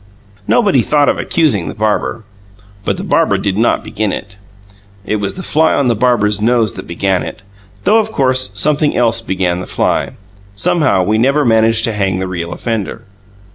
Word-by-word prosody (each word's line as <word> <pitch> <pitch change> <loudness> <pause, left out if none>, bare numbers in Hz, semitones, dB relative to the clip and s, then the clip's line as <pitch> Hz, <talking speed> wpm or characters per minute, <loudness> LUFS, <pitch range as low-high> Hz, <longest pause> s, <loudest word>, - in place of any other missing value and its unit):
Nobody 200 - +3
thought 145 +4 +2
of - - 0
accusing 135 - +1
the - - -7
barber. 110 +1 -1 0.6
But - - -1
the - - -5
barber - - +2
did 95 -2 -2
not 115 +3 +1
begin 105 -1 -2
it; 100 +2 -6 0.7
it 110 - -1
was 100 -1 -3
the 185 - -6
fly 160 0 +2
on 135 -3 +1
the - - +3
barber's 105 -3 +1
nose 115 -2 +2
that - - -9
began 95 +2 0
it 95 - -7 0.4
though, 220 +2 +4
of 220 0 -2
course, 130 - +1
something 150 +7 +1
else 115 -1 +2
began 95 -4 -1
the 90 - -6
fly. - - -1 0.4
Somehow, 150 - +1
we 110 +4 +1
never 140 +4 +2
manage 115 -1 +3
to 115 - 0
hang 95 -3 -1
the 95 - -2
real 85 -2 -5
offender. 115 -2 -4
110 Hz, 180 wpm, -15 LUFS, 100-135 Hz, 0.7 s, though